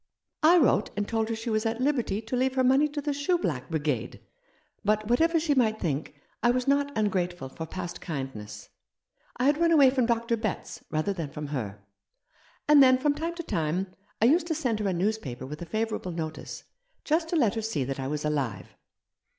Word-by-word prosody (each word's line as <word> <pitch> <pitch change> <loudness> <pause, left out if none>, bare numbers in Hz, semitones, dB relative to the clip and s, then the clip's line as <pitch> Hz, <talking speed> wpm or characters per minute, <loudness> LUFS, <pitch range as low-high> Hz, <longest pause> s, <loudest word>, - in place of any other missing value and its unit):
" - - -58
I 335 +3 +7
wrote 300 - +3
and 205 0 -1
told 225 -1 -1
her 225 - -1
she 225 +1 -4
was 215 0 +1
at 225 0 -1
liberty 245 -6 0
to 230 +3 -3
leave 260 +1 +1
her 260 - +3
money 265 +4 +4
to 295 0 -4
the 295 0 0
shoe 285 +6 +1
black 150 - -3
brigade; 145 -7 -2 0.6
but 215 +1 +1
what 240 +4 +2
ever 330 0 +4
she 310 -2 +1
might 220 -5 +2
think, 150 -2 -2 0.3
I 240 - +4
was 250 +1 +1
not 280 +1 +2
ungrateful 180 -8 -1
for 160 +4 -7
past 175 0 -6
kindness. 110 - -6 0.7
I 245 - -1
had 290 +2 +3
run 335 0 +4
away 280 -5 +7
from 255 -3 +1
Dr. 230 0 +1
Betts, 215 -3 -4
rather 155 +6 0
than 165 -6 -4
from 150 +1 -6
her. 105 -8 -5 0.8
And 295 -1 +7
then 255 -1 +7
from 290 +2 +2
time 330 +3 -4
to 340 - -5
time 180 - -2 0.3
I 220 - +4
used 325 +7 +4
to 320 - -1
send 245 -8 -1
her 210 - -1
a - - +1
newspaper 175 - -2
with 150 +4 -8
a 170 - -6
favourable 215 -1 -2
notice, 160 -1 -6 0.4
just 320 +2 +1
to 345 - -1
let 240 -11 +3
her 225 - -2
see 215 -11 -1
that 135 +1 -4
I 130 - -3
was 150 +1 -3
alive." 140 -10 -2
220 Hz, 215 wpm, -27 LUFS, -, 0.8 s, I